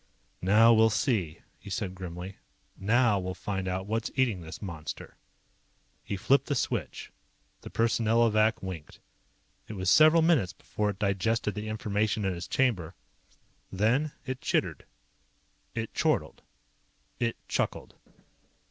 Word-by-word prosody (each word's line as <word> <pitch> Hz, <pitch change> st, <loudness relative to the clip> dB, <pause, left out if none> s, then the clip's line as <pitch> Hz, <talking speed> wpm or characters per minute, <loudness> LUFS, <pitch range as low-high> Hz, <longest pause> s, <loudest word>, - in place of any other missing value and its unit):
"Now 110 Hz, +5 st, +6 dB
we'll 110 Hz, 0 st, +5 dB
see," 100 Hz, -, 0 dB, 0.2 s
he 100 Hz, -, -11 dB
said 100 Hz, -3 st, -3 dB
grimly. 90 Hz, +1 st, -7 dB, 0.4 s
"Now 110 Hz, +1 st, +3 dB
we'll 95 Hz, 0 st, -4 dB
find 95 Hz, -2 st, -3 dB
out 95 Hz, +1 st, -2 dB
what's 110 Hz, +3 st, -2 dB
eating 120 Hz, -9 st, +1 dB
this 80 Hz, -1 st, -8 dB
monster." 85 Hz, -6 st, -7 dB, 0.9 s
He 100 Hz, -, -4 dB
flipped 135 Hz, +8 st, +3 dB
the 145 Hz, -, 0 dB
switch. -, -, -3 dB, 0.5 s
The -, -, -9 dB
Personnelovac 115 Hz, -1 st, +2 dB
winked. 90 Hz, -5 st, -7 dB, 0.7 s
It -, -, -7 dB
was 95 Hz, -2 st, 0 dB
several 155 Hz, -, +7 dB
minutes 160 Hz, -, +3 dB
before 105 Hz, -1 st, -3 dB
it 100 Hz, -, -4 dB
digested 105 Hz, +2 st, 0 dB
the 105 Hz, +2 st, -5 dB
information 105 Hz, -1 st, -1 dB
in 95 Hz, -2 st, 0 dB
its 85 Hz, -, -6 dB
chamber. 100 Hz, -12 st, 0 dB, 0.8 s
Then 115 Hz, +10 st, +1 dB
it 130 Hz, -1 st, -4 dB
chittered. -, -, -1 dB, 0.9 s
It 115 Hz, -1 st, -3 dB
chortled. -, -, 0 dB, 0.8 s
It 115 Hz, -1 st, 0 dB
chuckled. -, -, -2 dB
105 Hz, 130 wpm, -29 LUFS, 95-115 Hz, 0.9 s, several